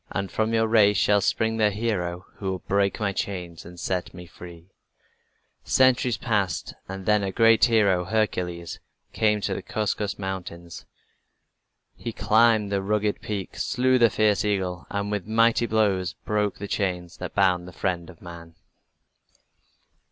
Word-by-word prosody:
And 100 -1 -4
from 110 0 0
your 115 0 +2
race 105 -2 +4
shall 100 +1 +3
spring 110 +3 0
the 105 -1 +3
hero 95 -5 -3
who 95 - -3
will 95 - -2
break 100 0 +1
my 100 -2 -1
chains 90 -4 -5
and 85 +1 -11
set 95 +1 -3
me 90 0 -9
free." 85 +1 -13 0.9
Centuries 125 -3 +3
passed 105 -7 -1 0.2
and 95 0 -6
then 105 -1 +3
a 100 -1 -2
great 115 +1 +5
hero, 100 -6 +2
Hercules, 90 -5 -2 0.3
came 105 -1 +1
to - - -1
the - - -4
Caucasus 105 -1 -2
Mountains. 90 -3 -7 1.1
He 115 - -6
climbed 110 -2 +3
the 100 -1 0
rugged 105 +1 -1
peak, 100 -3 -5
slew 130 -1 +1
the 115 -1 +6
fierce 105 0 +2
eagle, 95 -4 -2
and 100 0 -3
with 105 -2 -3
mighty 115 +1 +3
blows 100 -5 +1
broke 105 -2 0
the 100 - -6
chains 90 -4 -3
that 90 - -7
bound 90 -3 +2
the - - -9
friend 85 +2 -3
of 85 -3 -15
man. 85 -1 -11
100 Hz, 155 wpm, -25 LUFS, 90-110 Hz, 1.1 s, the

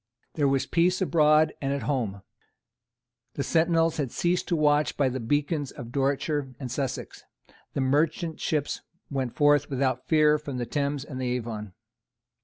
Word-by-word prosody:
There 145 -3 +1
was 135 -1 +1
peace 180 +2 +2
abroad 155 -3 +4
and 135 -1 -1
at 140 - -3
home. 110 -9 -2 1.1
The 140 - -1
sentinels 165 0 +2
had 140 -6 -2
ceased 175 +1 0
to 170 - +1
watch 150 -1 +2
by 140 -2 +3
the 130 +1 -3
beacons 145 +4 0
of 120 -1 -9
Dorsetshire 140 0 -1
and 130 -4 -5
Sussex. 135 0 -4 0.5
The 140 - 0
merchant 155 +4 +1
ships 150 -2 -1 0.3
went 130 -4 -2
forth 145 -1 +4
without 130 -2 -1
fear 150 -1 +4
from 140 -3 -6
the 120 - -2
Thames 140 +2 -2
and 130 -3 -6
the 125 -1 -1
Avon. 110 -5 -5
145 Hz, 160 wpm, -27 LUFS, 130-155 Hz, 1.1 s, abroad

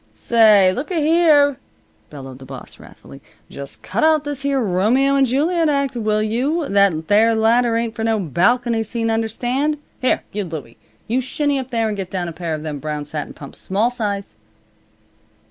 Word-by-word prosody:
"Say 215 -5 +5
looka 305 +7 -4
here!" 305 -3 +4 0.5
bellowed 135 -3 -10
the 135 - -11
boss, - - -10
wrathfully. 70 +1 -14 0.3
"Just 140 -1 -9
cut 210 +5 -2
out 315 -1 +4
this 290 -2 -5
here 280 -1 0
Romeo 230 +7 +2
and 270 -1 +3
Juliet 315 +6 +1
act, 280 -3 0
will 215 -2 0
you! 275 +9 -1
That 195 -6 +2
there 220 +2 +4
ladder 230 +1 +2
ain't 230 -1 -2
for 225 - -5
no 225 -1 +1
balcony 225 - +1
scene, 225 +1 -2
understand. 245 +7 -1 0.2
Here 255 - +1
you, 205 0 -3
Louie, 155 -10 -8 0.3
you 245 +4 0
shinny 280 +2 -1
up 260 -1 -6
there 230 -3 0
and 215 - -2
get 190 -2 -5
down 180 -2 -3
a - - -4
pair 165 -1 -4
of 155 - -8
them 150 -2 -5
brown 150 0 -4
satin 150 0 -6
pumps, 140 - -9
small 210 +6 0
size." 205 -5 -4
225 Hz, 180 wpm, -19 LUFS, 190-270 Hz, 0.5 s, Say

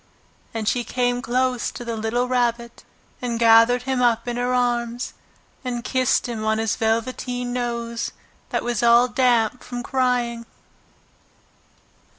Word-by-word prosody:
And 220 -2 -4
she 245 +2 +1
came 245 0 0
close 250 0 0
to 240 - -8
the 230 -1 -3
little 225 +3 -1
Rabbit 240 -1 -1 0.4
and 240 -2 -2
gathered 230 +2 +5
him 260 -1 -1
up 235 -1 +2
in 240 - -2
her 245 +1 -1
arms 240 -1 -1 0.5
and 240 -2 -3
kissed 255 -1 +1
him 225 -3 -4
on 220 0 +1
his 225 0 0
velveteen 245 +2 -1
nose 235 -1 -3 0.4
that - - -1
was 240 -2 -1
all 235 +1 +6
damp 245 -1 +2
from 245 -1 -6
crying. 245 -3 0
240 Hz, 140 wpm, -22 LUFS, 230-250 Hz, 0.5 s, all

